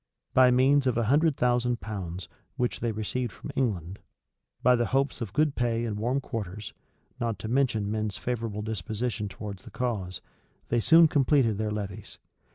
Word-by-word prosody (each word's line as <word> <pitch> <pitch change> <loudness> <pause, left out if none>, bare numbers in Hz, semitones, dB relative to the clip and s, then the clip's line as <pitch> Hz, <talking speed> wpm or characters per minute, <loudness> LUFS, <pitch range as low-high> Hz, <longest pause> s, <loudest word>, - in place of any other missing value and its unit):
By 130 -1 +7
means 130 +2 +4
of 125 - +1
a 120 - +2
hundred 145 +6 +3
thousand 120 -1 +1
pounds, 95 -4 -6 0.3
which 125 -1 -1
they 115 - -1
received 110 +2 -3
from - - -8
England; 100 -8 -1 0.6
by 125 0 +6
the 120 -1 +1
hopes 135 0 0
of 110 -5 -4
good 150 +3 +2
pay 120 -2 0
and 110 -3 -2
warm 125 +5 +1
quarters; 105 -5 -6 0.5
not 115 -3 -1
to 105 - -6
mention 115 -5 +1
men's 110 -3 -2
favorable 115 -4 -3
disposition 110 +1 -3
towards 100 0 -7
the - - -12
cause; 100 -8 -3 0.5
they 120 - +2
soon 165 +7 +7
completed 135 -7 +2
their 110 -1 0
levies. 100 -2 -5
115 Hz, 165 wpm, -28 LUFS, 105-125 Hz, 0.6 s, By